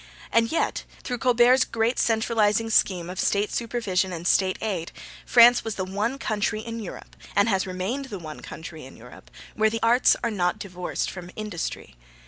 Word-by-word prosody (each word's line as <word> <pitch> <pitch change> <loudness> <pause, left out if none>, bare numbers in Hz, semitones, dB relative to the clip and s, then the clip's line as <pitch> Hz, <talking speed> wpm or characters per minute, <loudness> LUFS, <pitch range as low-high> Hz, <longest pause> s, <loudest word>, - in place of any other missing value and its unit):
And 230 0 +3
yet, 330 - 0 0.2
through 245 -2 -4
Colbert's 250 +1 +5
great 230 +2 -1
centralising 225 -1 +1
scheme 180 -5 +2
of 185 +1 -6
State 205 +1 +1
supervision 205 -6 -1
and 170 -1 -6
State 185 0 +2
aid, 190 -7 -3 0.4
France 240 0 +7
was 225 -2 -4
the 185 - -3
one 210 +7 -2
country 215 -3 -1
in 230 +1 -6
Europe, 205 -5 -9 0.2
and 200 - +4
has 195 -3 +1
remained 190 +10 -3
the 210 -7 -7
one 155 -3 -8
country 160 -1 -9
in 130 - -12
Europe, 125 +2 -14 0.2
where 220 0 +2
the 225 +1 -4
arts 240 +2 +5
are 235 - 0
not 180 -4 0
divorced 180 -2 -4
from 180 -1 -9
industry. 175 - -5
210 Hz, 175 wpm, -25 LUFS, 185-230 Hz, 0.4 s, France